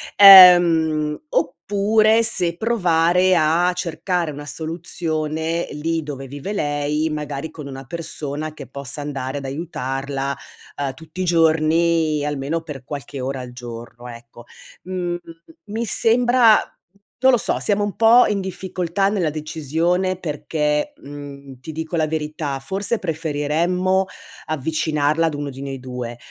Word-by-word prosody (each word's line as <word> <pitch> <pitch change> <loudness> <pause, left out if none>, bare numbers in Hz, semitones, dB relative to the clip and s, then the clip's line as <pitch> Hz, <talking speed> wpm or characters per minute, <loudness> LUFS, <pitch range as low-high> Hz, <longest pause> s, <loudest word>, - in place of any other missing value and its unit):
Ehm, 170 -6 +8
oppure 215 +6 +2
se 175 -6 0
provare 180 -4 +2
a 165 +3 +3
cercare 175 -1 -2
una 145 +1 -8
soluzione 160 0 -3
lì 160 +2 -2
dove 135 -2 -7
vive 145 +9 -6
lei, 150 -1 -1
magari 150 +1 -5
con 150 -3 -9
una 135 0 -8
persona 155 -1 -4
che 140 - -9
possa 140 +2 -7
andare 140 -1 -4
ad 140 - -6
aiutarla, 135 -2 -4 0.4
uhm, 140 -2 -2
tutti 160 +3 -9
i - - 0
giorni, 160 -2 +2
almeno 145 +3 -2
per 145 -5 -9
qualche 140 -1 -7
ora 130 0 -3
al 125 -1 -8
giorno 120 0 -9
ecco. 120 0 -12 0.4
Mhmm, 180 -1 -3 0.5
mi 225 +3 -3
sembra 235 +1 +4 0.7
non 260 -1 +6
lo - - +5
so, - - 0
siamo 205 0 +1
un 205 - -3
po’ 230 +2 +6
in 200 -2 -1
difficoltà 190 0 -2
nella 185 -7 0
decisione 160 +4 -1
perché, 150 - -2
mhmm, 140 -2 -10
ti 160 +5 -8
dico 160 +2 -5
la 155 -1 +1
verità: 150 -2 -3
forse 195 - -2
preferiremmo 170 +3 0 0.4
avvicinarla 155 +1 0
ad 150 - -3
uno 145 -1 -4
di 135 +1 -10
noi 135 -1 -5
2. 125 -2 -6
160 Hz, 135 wpm, -21 LUFS, 145-180 Hz, 0.7 s, Ehm